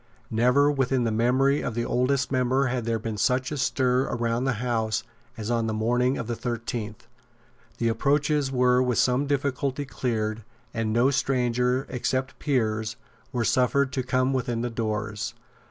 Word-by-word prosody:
Never 125 +6 +4
within 135 -2 +1
the 115 - 0
memory 130 +5 +2
of 115 - -3
the 120 0 -1
oldest 130 +2 +1
member 130 +1 +2
had 125 -2 -1
there 115 -1 0
been 110 -1 -4
such 130 +6 +1
a 150 - -3
stir 130 0 +1
round 120 +2 0
the 135 - +2
House 115 -1 -1 0.3
as 110 +1 -3
on 115 -1 +1
the 110 - -1
morning 125 +4 +1
of - - -3
the 120 +1 -3
thirteenth. 115 -2 -4 0.7
The 115 - 0
approaches 140 +4 +1
were 125 -1 +3
with 125 -3 +1
some 130 +3 +2
difficulty 140 0 -1
cleared; 110 -4 -2 0.3
and 115 -1 -1
no 120 +5 +3
strangers, 125 -1 +1
except 130 +1 -2
peers, 110 -5 0 0.4
were 120 -3 -1
suffered 130 +2 +2
to 130 - 0
come 130 +1 +1
within 120 -3 -1
the 120 0 -2
doors. 110 -2 -3
125 Hz, 165 wpm, -26 LUFS, 115-130 Hz, 0.7 s, Never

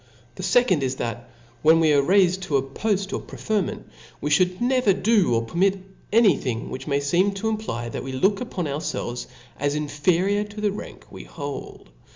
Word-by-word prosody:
The - - -8
fecond 245 - +3
is, 130 -1 -1
that 120 -1 -5 0.3
when 160 +1 +6
we 160 -2 +4
are 140 - +5
raifed 185 +3 +3
to 145 - +2
a 135 - 0
poft 195 +8 -2
or - - -1
preferment, 210 -3 -3 0.3
we 150 - -3
(hould 180 +4 +3
never 250 -4 +3
do 200 - +2
or 115 - +1
permit 190 +9 +1 0.3
any 215 -6 +5
thing, 120 -3 -4
which 130 - -6
may 140 -1 +1
feeni 180 +8 +1
to 220 +3 -1
imply 210 - -3
that - - -5
we 135 - -5
look 195 +10 +1
up 245 -4 -7
on 180 - 0
ourfelves 145 -4 -3 0.3
as 145 +1 0
inferior 175 +7 +1
to 210 0 -10
the 210 -1 +1
rank 205 - -9
we - - -9
hold. 140 - -8
175 Hz, 195 wpm, -24 LUFS, 140-205 Hz, 0.3 s, when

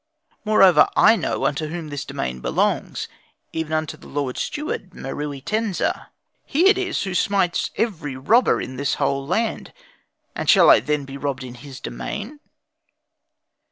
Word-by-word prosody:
Moreover, 200 -4 +6
I 225 - +7
know - - -2
unto 150 +2 0
whom 160 -1 -6
this 145 -1 -5
domain 65 0 -4
belongs, - - -1 0.5
even 160 -1 -3
unto 155 -1 -1
the - - -15
Lord 140 -3 -3
Steward 295 - -4
Meruitensa. 150 +10 -3 0.4
He 335 +7 +2
it 390 -1 +3
is 365 -2 -1
who 190 -2 -3
smites 185 -2 +1
every 165 - -2
robber 225 - +3
in 130 0 -6
this 140 +1 0
whole 140 0 -1
land; 220 +7 -1 0.6
and - - -3
shall - - +8
I - - +7
then 150 -2 -1
be 135 0 -8
robbed 140 -2 -3
in 125 -1 -8
his 135 +1 -11
domain?" 235 +9 -6
155 Hz, 150 wpm, -22 LUFS, 140-215 Hz, 0.6 s, shall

